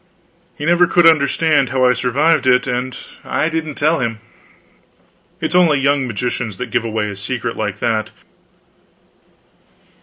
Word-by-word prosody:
He 150 - -5
never 175 +1 +4
could 175 0 +3
understand 155 -2 +3
how 130 +1 +1
I 125 - +4
survived 130 +4 +1
it, 125 0 +4
and 125 0 -3 0.3
I 155 - -1
didn't 160 -2 -4
tell 155 +3 +1
him. 115 -3 -2 1.2
It - - -2
is - - -3
only 170 -5 +4
young 140 -1 +1
magicians 120 -2 -3
that - - -6
give - - 0
away 110 -2 -2
a - - -8
secret 115 +3 -4
like 105 -2 -3
that. 110 -1 -1
130 Hz, 150 wpm, -17 LUFS, 115-155 Hz, 1.2 s, never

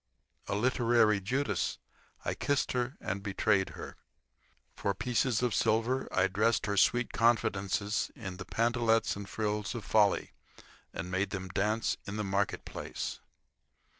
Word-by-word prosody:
A - - -1
literary 115 -2 +3
Judas, 110 -1 -1 0.5
I - - 0
kissed 145 -1 0
her 125 +1 -1
and 100 +2 -3
betrayed 100 -1 +1
her. - - -8 0.8
For 100 - -1
pieces 125 +2 +1
of 120 -3 +1
silver 115 +6 +1
I 95 - +3
dressed 110 +4 +1
her 100 -1 -1
sweet 120 +5 +3
confidences 105 -3 +1
in 95 -5 -7
the 95 - -7
pantalettes 115 -1 +2
and 100 0 -7
frills 105 -1 -2
of 110 -4 -5
folly 105 -2 +3 0.6
and 90 +2 -5
made 95 +2 0
them 95 -1 -5
dance 105 +5 0
in 100 - -4
the 105 - -1
market 100 0 -1
place. - - -5
105 Hz, 140 wpm, -31 LUFS, 100-115 Hz, 0.8 s, literary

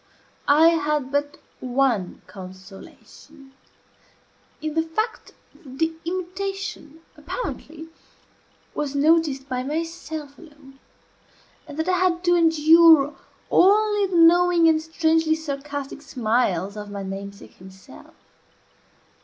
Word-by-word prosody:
I 310 +3 +6
had 300 -4 -1
but 290 +1 -2 0.2
one 250 -7 -1
consolation 215 - -14 1.1
in 310 0 -4
the 320 - +1
fact 430 +8 -4 0.2
that 265 -5 -14
the 325 +1 0
imitation, 370 -3 -5
apparently, 320 -1 -7 0.9
was 285 -1 -4
noticed 290 -2 +2
by 255 -2 -3
myself 310 0 -6
alone, 290 -4 -17 0.9
and 290 - -10
that 320 +2 -2
I 365 -1 +1
had 360 -1 +1
to 350 -1 +3
endure 320 -2 +5 0.4
only 415 +1 +4
the 365 -2 -1
knowing 340 0 +5
and 315 -1 +3
strangely 320 0 +1
sarcastic 285 -2 -6
smiles 220 - -1
of 210 -1 -8
my 200 -1 -6
namesake 200 +1 -9
himself. 190 +1 -15
305 Hz, 105 wpm, -23 LUFS, 270-330 Hz, 1.1 s, I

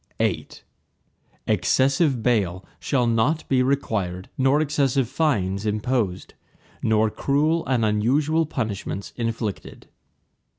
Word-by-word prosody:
VIII - - 0 1.0
Excessive 130 - +2
bail 95 -7 0
shall 130 -4 0
not 120 +8 +1
be 130 -2 +2
required 105 -9 -1
nor 135 +2 +3
excessive 140 -4 +1
fines 100 - 0
imposed, 105 -2 -1 0.5
nor 110 0 +2
cruel 155 +7 +1
and 125 -4 +1
unusual 140 +10 +1
punishments 105 -7 -4
inflicted. 115 -4 -4
120 Hz, 95 wpm, -23 LUFS, 105-140 Hz, 1.0 s, nor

